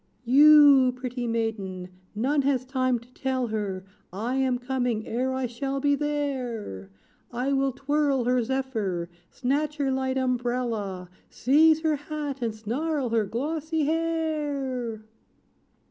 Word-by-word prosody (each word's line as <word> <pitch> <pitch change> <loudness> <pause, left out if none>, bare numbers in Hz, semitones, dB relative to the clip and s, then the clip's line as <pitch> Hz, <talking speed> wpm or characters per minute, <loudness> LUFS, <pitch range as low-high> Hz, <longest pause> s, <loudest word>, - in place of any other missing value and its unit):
"You, 280 -1 +7
pretty 250 -1 -4
maiden 210 -6 -3 0.3
none 275 +7 +1
has 265 -2 0
time 255 -1 0
to 240 +2 -16
tell 260 -1 -1
her 200 -3 -3 0.3
I 220 +7 -3
am 260 -2 +1
coming, 245 -3 -2
ere 255 +3 -1
I 260 0 -1
shall 270 +3 -3
be 285 +1 +2
there. 260 - -3 0.4
I 250 +3 -1
will 270 0 +1
twirl 275 0 0
her 250 +1 +2
zephyr 220 -9 -2 0.2
snatch 290 +4 -1
her 275 -2 0
light 265 0 -1
umbrella, 240 -7 -2 0.2
Seize 310 +5 +4
her 315 -2 +1
hat, 290 -2 -5
and 225 -2 -2
snarl 260 +5 -2
her 225 -2 +1
glossy 305 +7 -2
hair!" 295 -8 -2
260 Hz, 130 wpm, -26 LUFS, 230-285 Hz, 0.4 s, You